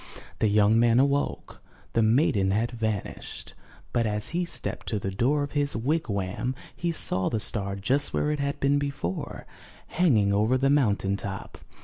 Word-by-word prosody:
The 110 - +3
young 105 +2 +4
man 120 0 +4
awoke. 140 +1 -1 0.3
The 115 - +3
maiden 110 -4 +3
had 110 +5 0
van 110 -4 -1
ished, - - -9 0.4
but 115 -2 +1
as 105 0 -2
he 175 +1 -1
stepped - - -6
to 110 - -1
the 95 -1 -3
door 135 +9 +1
of 145 - -5
his 145 -1 0
wigwam, 120 - -1 0.2
he 170 -1 -1
saw 95 - +2
the 110 - -1
star 100 -2 +1
just 130 +9 +1
where 150 - 0
it 150 - -2
had 140 +1 -2
been 140 +1 +2
before, 140 -11 -4 0.4
hanging 115 - +2
over 110 +5 +2
the 135 +1 +2
mountain 100 -8 +2
top. 100 -1 -7
115 Hz, 170 wpm, -26 LUFS, 100-140 Hz, 0.4 s, young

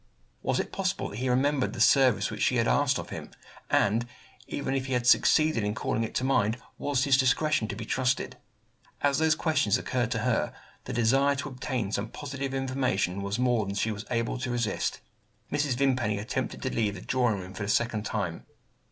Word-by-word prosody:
Was - - 0
it - - -3
possible 195 -1 -2
that 100 - -8
he 130 +2 -1
remembered 135 +2 +1
the 120 - -7
service 130 +1 +4
which 110 - -6
she 125 - +3
had 115 -1 +2
asked 140 -2 +3
of - - -7
him; - - -6 0.4
and, 115 +4 +2 0.4
even 135 -1 -3
if 135 -1 -1
he 130 - -2
had 125 -1 0
succeeded 155 0 +4
in 105 +1 -1
calling 115 - -1
it 110 - -5
to - - 0
mind, 115 -4 +2 0.2
was 140 -2 +1
his 135 -1 +4
discretion 140 -1 +2
to - - -4
be 115 - -6
trusted? 125 +2 0 0.6
As 140 -1 +2
those 160 -1 +3
questions 145 - +2
occurred - - -1
to - - -1
her, - - +1 0.3
the - - -5
desire 135 +5 +3
to 140 +1 -4
obtain 125 -5 -3
some 105 +1 -1
positive 135 -1 -5
information 130 -8 0
was 100 +2 -2
more 125 -3 +2
than 100 - -4
she 110 +2 0
was 105 0 -6
able 120 +1 -1
to 125 0 -3
resist. 120 -4 -1 0.5
Mrs. 145 -3 +1
Vimpany 125 -6 +1
attempted 105 +2 -3
to - - -2
leave 105 -3 0
the 90 - -8
drawing 120 -3 +1
room 95 0 -8
for 100 - -8
the 100 - -2
second 115 -1 +1
time. 95 -7 -3
125 Hz, 205 wpm, -28 LUFS, 110-135 Hz, 0.6 s, service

